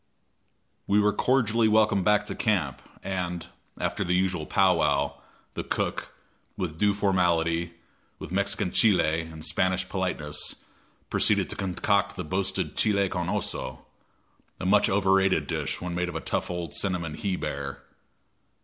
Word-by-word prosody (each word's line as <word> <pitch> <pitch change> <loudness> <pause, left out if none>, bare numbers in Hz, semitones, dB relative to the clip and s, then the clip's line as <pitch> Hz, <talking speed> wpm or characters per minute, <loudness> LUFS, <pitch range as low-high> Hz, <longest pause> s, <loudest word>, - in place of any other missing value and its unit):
We 100 +1 +4
were 105 0 +3
cordially 115 -3 +2
welcomed 110 -3 +3
back 105 0 +3
to - - -3
camp, 85 - 0 0.2
and, 90 -3 -3 0.3
after - - -1
the 90 +1 +1
usual 90 -4 0
pow 95 -3 +4
wow, 70 -2 0 0.3
the - - -4
cook, - - -2 0.5
with 80 -3 -4
due 105 -1 +3
formality, 85 -4 +1 0.4
with - - -9
Mexican 100 0 0
chile 85 -7 +3
and 80 -1 -7
Spanish 95 +4 +1
politeness, 90 -6 -2 0.6
proceeded - - +2
to - - -2
concoct 100 +1 0
the 90 - -4
boasted 95 +4 -2
chile 100 -2 +2
con 90 -2 -2
oso 65 -7 -3 0.8
a - - -4
much 100 +2 +4
overrated 95 -1 +3
dish - - -3
when 90 0 -4
made 90 0 -1
of 85 - -7
a - - -1
tough - - -2
old 85 -3 -4
cinnamon 90 -5 -1
he 95 +4 -2
bear. 70 -4 -5
90 Hz, 145 wpm, -27 LUFS, 85-100 Hz, 0.8 s, We